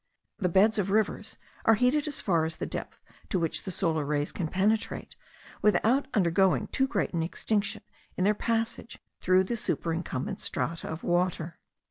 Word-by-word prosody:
The 180 - +1
beds 210 +5 +4
of 195 -1 0
rivers 210 +1 0 0.3
are 225 - +6
heated 260 +7 +2
as 295 - -2
far 170 -5 +2
as 160 - -2
the - - -3
depth - - -6 0.3
to - - +1
which 165 +2 -1
the 190 - -3
solar 165 -4 0
rays 145 0 -1
can 175 - -3
penetrate 205 +6 0 0.5
without 230 +6 +3
undergoing 190 -1 +3
too 265 - +1
great 275 - -1
an 170 - 0
extinction 200 +5 -1 0.3
in 185 - +1
their 205 +2 +4
passage 230 +1 -2 0.2
through 185 +1 +4
the 215 +5 -2
superincumbent 165 - -2
strata 160 +7 -2
of 160 +1 -6
water. 175 -2 0
190 Hz, 165 wpm, -28 LUFS, 165-220 Hz, 0.5 s, are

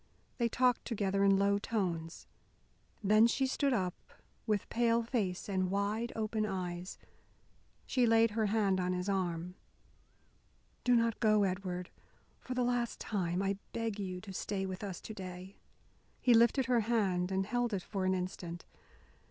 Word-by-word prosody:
They 235 -1 +2
talked 250 +1 +2
together 200 -3 0
in 195 -1 +5
low 200 +1 +3
tones. 175 -7 -3 0.8
Then 215 +3 +6
she 265 +3 +1
stood 275 +1 +1
up, 185 -7 0 0.5
with 210 -2 0
pale 235 0 +2
face 210 -7 -2
and 185 -2 0
wide 205 +4 -1
open 215 0 -1
eyes. 185 -2 -4 0.9
She 250 -2 +2
laid 225 0 +5
her 215 0 +1
hand 200 -3 +2
on 180 0 0
his 180 +1 -2
arm. 180 -3 -1 1.3
"Do 245 -1 +4
not 230 -1 +2
go, 215 -2 +4
Edward. 185 -2 -3 0.5
For 255 - -6
the 250 - +1
last 245 -1 0
time 185 -3 -1
I 195 0 -1
beg 225 -3 -2
you 185 -2 -4
to 195 -1 -9
stay 195 +1 -2
with 190 +1 -5
us 195 -3 -5
to 220 - -7
day." 185 -1 -8 0.6
He 245 - +4
lifted 235 +3 +5
her 250 -2 +3
hand 200 -5 +1
and 190 0 0
held 245 +2 0
it 195 -4 -2
for 195 -3 -3
an 185 0 +2
instant. 180 -2 -5
200 Hz, 160 wpm, -33 LUFS, 185-230 Hz, 1.3 s, Then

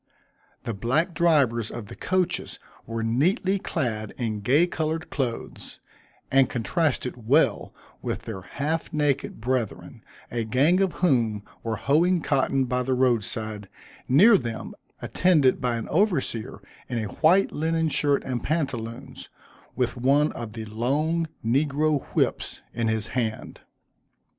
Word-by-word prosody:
The 115 - -3
black 130 - 0
drivers 140 -10 +2
of 120 -3 -7
the - - -10
coaches 180 -1 -1 0.3
were 115 0 -3
neatly 185 - +1
clad 110 - -3
in 110 -4 -2
gay 140 +11 +4
colored 160 -1 -3
clothes, 125 -5 -4 0.5
and 135 0 +4
contrasted 125 -3 -1
well 135 -4 +3 0.3
with - - -4
their 100 -4 -6
half 150 - -3
naked 150 -7 -1
brethren, 120 -1 -3 0.3
a 115 -1 -1
gang 140 +11 +3
of 195 -2 +2
whom 115 - +1 0.2
were 115 -1 -2
hoeing 170 - +2
cotton 135 -1 +1
by 125 +1 -1
the 130 +1 0
road 125 -4 +3
side, 110 -3 -5 0.4
near 195 - +7
them, 115 -3 -5 0.3
attended 155 -8 +3
by 125 -2 0
an 115 - -4
overseer 130 - 0 0.3
in 120 - -2
a 110 - -1 0.2
white 175 +5 +5
linen 160 +1 0
shirt 145 -2 +1
and 125 -2 -3
pantaloons, 130 -4 -4 0.5
with 125 -1 -1
one 140 +5 +3
of 115 -3 -7
the 110 -1 -6
long 145 +10 0 0.2
negro 145 +4 +1
whips - - 0
in 115 -1 -1
his 110 -1 -1
hand. 115 -4 -3
130 Hz, 135 wpm, -25 LUFS, 115-155 Hz, 0.5 s, near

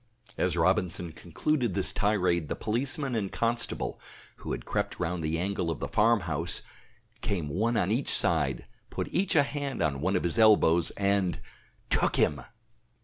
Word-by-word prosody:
As 90 -1 0
Robinson 90 -1 +1
concluded 115 - -1
this 95 - 0
tirade 90 -6 +1
the - - -1
policeman 135 +4 -2
and 105 -4 -2
constable, 115 0 -1 0.4
who - - -7
had - - -4
crept - - -2
round 90 -1 -2
the 80 +1 -1
angle 90 -1 -1
of 80 - -3
the - - -3
farm 115 0 +3
house, 85 +1 -2 0.6
came 95 -8 -2
one 110 +9 0
on 90 - +1
each 125 +5 0
side, - - +2 0.2
put - - -4
each 185 +1 +2
a 145 - +6
hand 140 -3 -4
on 70 -3 -1
one 95 +4 +1
of 90 - 0
his 85 +7 -1
elbows 95 -6 +5
and 100 -2 +1 0.5
took - - +3
him! 75 -3 +2
95 Hz, 165 wpm, -28 LUFS, 85-115 Hz, 0.6 s, a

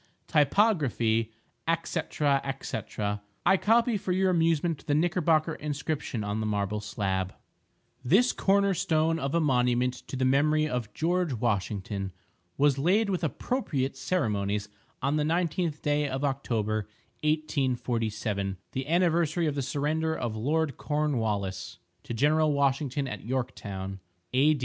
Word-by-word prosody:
typography, 140 - +2 0.5
&c., 170 - -1 0.6
&c. 110 - -3 0.6
I 195 - +6
copy 230 +3 +3
for 185 - -3
your 185 +1 +3
amusement 165 -2 +1
the 145 - +2
Knickerbocker 165 -1 +2
inscription 145 -6 -3
on 105 +1 -2
the 110 - -1
marble 105 0 -1
slab:— 95 -3 -2 0.7
This 205 - +4
Corner 200 0 +2
Stone 160 -1 +1
of 140 +1 -2
a - - +4
Monument 125 -4 +2
to - - -5
The 130 0 +1
Memory 150 +4 +3
of 125 -6 -3
GEORGE 175 -1 +1
WASHINGTON 100 -3 -2 0.4
Was 140 -1 +3
Laid 200 +8 +3
With 180 -2 -1
Appropriate 145 - -1
Ceremonies 105 - -1 0.3
on 140 +3 +2
the 150 - +1
19th 165 0 0
Day 145 0 +1
of 135 +1 -3
October, 110 -6 -1 0.4
1847 120 -9 -1
The 130 +1 -3
anniversary 170 -1 +2
of 150 - +1
the 140 - -1
surrender 155 +4 0
of 115 -3 -3
Lord 145 +5 0
Cornwallis 110 -11 -1 0.3
to 120 - -4
General 150 +4 +3
Washington 140 0 +1
at - - -6
Yorktown 100 -6 -4 0.3
A. 145 +4 +4
140 Hz, 130 wpm, -28 LUFS, 115-160 Hz, 0.7 s, I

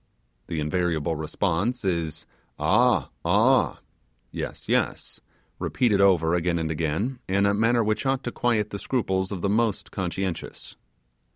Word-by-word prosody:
The 80 - -3
invariable 80 0 0
response 95 +9 -1
is 85 -4 -1 0.3
'Aa, - - +3
Aa' - - +3 0.5
(yes, - - -6
yes), - - -1 0.4
repeated 110 -6 +1
over 85 -4 +4
again 85 0 +1
and 80 -1 -2
again 85 - -2
in 100 +1 +2
a 100 - +3
manner 115 +3 +3
which 110 +5 -1
ought 135 0 0
to 120 - -3
quiet 110 -4 0
the 100 - -4
scruples 95 -7 -1
of 95 -4 -5
the - - +2
most 110 0 0
conscientious. 95 -1 -4
95 Hz, 135 wpm, -25 LUFS, 85-110 Hz, 0.5 s, over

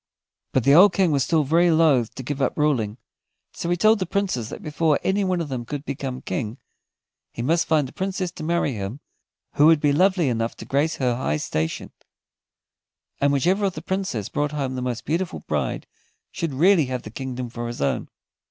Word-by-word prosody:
But 130 - +1
the 140 +3 +5
old 185 +4 +7
King 180 -2 +2
was 140 -3 +2
still 160 +1 +2
very 165 +5 +3
loth 155 -8 +3
to 130 - -6
give 140 +2 -4
up 130 - 0
ruling, 125 -8 +1 0.6
so 170 - -4
he 175 - +1
told 215 +3 +4
the 185 - -2
Princes 175 - -1
that - - -8
before 150 0 +1
any 200 +1 +1
one 185 -2 0
of 165 - -3
them 130 -3 -3
could 145 +4 -6
become 130 -2 -5
King 120 -6 -3 0.7
he 120 - -5
must 165 +6 +1
find 155 -4 +2
a - - -12
Princess 190 -2 -3
to 165 - -9
marry 170 -3 0
him 105 +4 -5 0.6
who 150 - +7
would 160 -2 +6
be 145 -1 +2
lovely 185 0 +3
enough 115 -2 -1
to - - -10
grace 145 +4 0
her 125 -3 0
high 75 - -1
station; 80 +1 -3 1.3
and 140 +1 +3
whichever 180 +9 +2
of 190 - 0
the 155 - -6
Princes 185 - -2
brought 145 0 -2
home 135 -3 -2
the 130 - -4
most 125 -2 -3
beautiful 170 +3 -2
bride - - -2 0.5
should 165 -3 -3
really 170 +2 +4
have 125 -1 -4
the 110 - -9
kingdom 130 0 -5
for 120 0 -5
his 120 - -6
own. 70 - -1
145 Hz, 205 wpm, -23 LUFS, 125-170 Hz, 1.3 s, old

